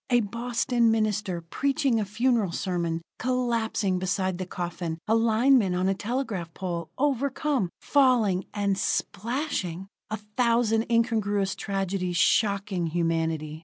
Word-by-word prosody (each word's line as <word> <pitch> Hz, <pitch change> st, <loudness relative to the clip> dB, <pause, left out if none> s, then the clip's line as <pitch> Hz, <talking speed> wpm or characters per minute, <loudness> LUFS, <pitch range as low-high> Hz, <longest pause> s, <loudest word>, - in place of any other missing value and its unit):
A 245 Hz, -1 st, +4 dB
Boston 235 Hz, +2 st, 0 dB
minister, 210 Hz, -5 st, 0 dB
preaching 270 Hz, -, 0 dB
a 210 Hz, -, -1 dB
funeral 220 Hz, -1 st, +1 dB
sermon, 170 Hz, -2 st, -2 dB, 0.2 s
collapsing 230 Hz, -6 st, 0 dB
beside 185 Hz, -1 st, -1 dB
the 185 Hz, -, -4 dB
coffin; 170 Hz, -2 st, -4 dB
a 220 Hz, -, +3 dB
lineman 225 Hz, -2 st, +4 dB
on 185 Hz, +1 st, +1 dB
a 195 Hz, -, +3 dB
telegraph 205 Hz, -5 st, -3 dB
pole, 170 Hz, -3 st, -4 dB
overcome, 275 Hz, -, 0 dB
falling 240 Hz, -9 st, +3 dB
and 200 Hz, -2 st, 0 dB
splashing! 200 Hz, -, -2 dB, 0.2 s
A 215 Hz, -, -2 dB
thousand 225 Hz, +1 st, +1 dB
incongruous 215 Hz, -4 st, +1 dB
tragedies 195 Hz, -3 st, -2 dB
shocking 200 Hz, -3 st, +2 dB
humanity. 160 Hz, -2 st, -1 dB
205 Hz, 120 wpm, -26 LUFS, 180-235 Hz, 0.2 s, A